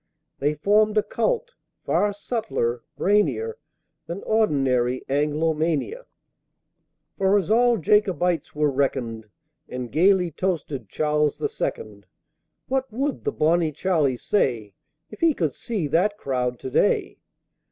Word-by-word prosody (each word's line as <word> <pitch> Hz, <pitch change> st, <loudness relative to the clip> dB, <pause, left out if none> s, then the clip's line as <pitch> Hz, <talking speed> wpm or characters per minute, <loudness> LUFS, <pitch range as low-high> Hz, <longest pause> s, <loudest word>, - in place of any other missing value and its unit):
They 145 Hz, +2 st, +1 dB
formed 210 Hz, +6 st, +3 dB
a 210 Hz, -, +4 dB
Cult, -, -, -1 dB, 0.3 s
far 205 Hz, -, +2 dB
subtler, 205 Hz, -, -2 dB, 0.2 s
brainier, 140 Hz, -, +1 dB, 0.5 s
Than 175 Hz, +4 st, -6 dB
ordinary 135 Hz, -, +1 dB
Anglomania, 155 Hz, -, 0 dB, 1.1 s
For 195 Hz, +1 st, +4 dB
all 240 Hz, +1 st, +4 dB
as -, -, -7 dB
Jacobites 180 Hz, -7 st, +2 dB
were 150 Hz, -1 st, +2 dB
reckoned, 120 Hz, -5 st, -2 dB, 0.4 s
And 125 Hz, -1 st, -5 dB
gaily 180 Hz, +1 st, +3 dB
toasted 150 Hz, -, -3 dB
Charles 150 Hz, +2 st, 0 dB
the 435 Hz, -, -2 dB
Second! 465 Hz, +1 st, -5 dB, 0.6 s
(What 265 Hz, -1 st, -1 dB
would 275 Hz, +5 st, -2 dB
the -, -, +1 dB
Bonnie 160 Hz, +1 st, +2 dB
Charlie 155 Hz, -8 st, +1 dB
say, 120 Hz, -, 0 dB, 0.4 s
If 215 Hz, -, -11 dB
he 330 Hz, -3 st, +3 dB
could 155 Hz, -6 st, -1 dB
see 215 Hz, -9 st, -3 dB
that 205 Hz, +7 st, +2 dB
crowd 125 Hz, -6 st, -2 dB
to 130 Hz, -, -5 dB
day?) -, -, +1 dB
165 Hz, 120 wpm, -24 LUFS, 135-210 Hz, 1.1 s, a